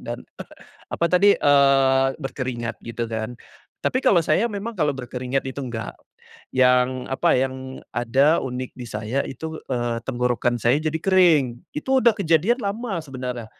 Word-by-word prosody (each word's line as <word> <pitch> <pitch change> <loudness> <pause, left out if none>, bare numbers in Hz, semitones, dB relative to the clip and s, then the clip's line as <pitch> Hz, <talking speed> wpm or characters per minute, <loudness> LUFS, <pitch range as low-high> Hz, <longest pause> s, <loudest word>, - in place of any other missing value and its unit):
dan - - -7 0.6
apa - - -2
tadi, 200 +3 +5
eee, 135 -2 +4
berkeringat 125 -5 -5
gitu 115 0 -4
kan, 110 +1 -4 0.5
tapi 255 - +1
kalau 185 -9 +4
saya 190 +10 +2
memang 210 +2 -5
kalau 150 -4 +1
berkeringat 130 +1 -3
itu 130 +2 -6
enggak, 120 -5 -5 0.6
yang 125 0 +3
apa, 130 - +2
yang 130 0 -3
ada 135 +7 +2
unik 130 -1 -5
di 125 -2 -7
saya 110 +5 -2
itu, 160 +4 -7
eee, 120 -2 -1
tenggorokan 120 -1 0
saya 125 +7 +2
jadi 155 0 -1
kering, 175 -7 +4 0.3
itu 150 - -4
udah 235 -2 +5
kejadian 190 - +2
lama 205 -1 -3
sebenarnya, 125 -4 -6
130 Hz, 145 wpm, -23 LUFS, 125-160 Hz, 0.6 s, tadi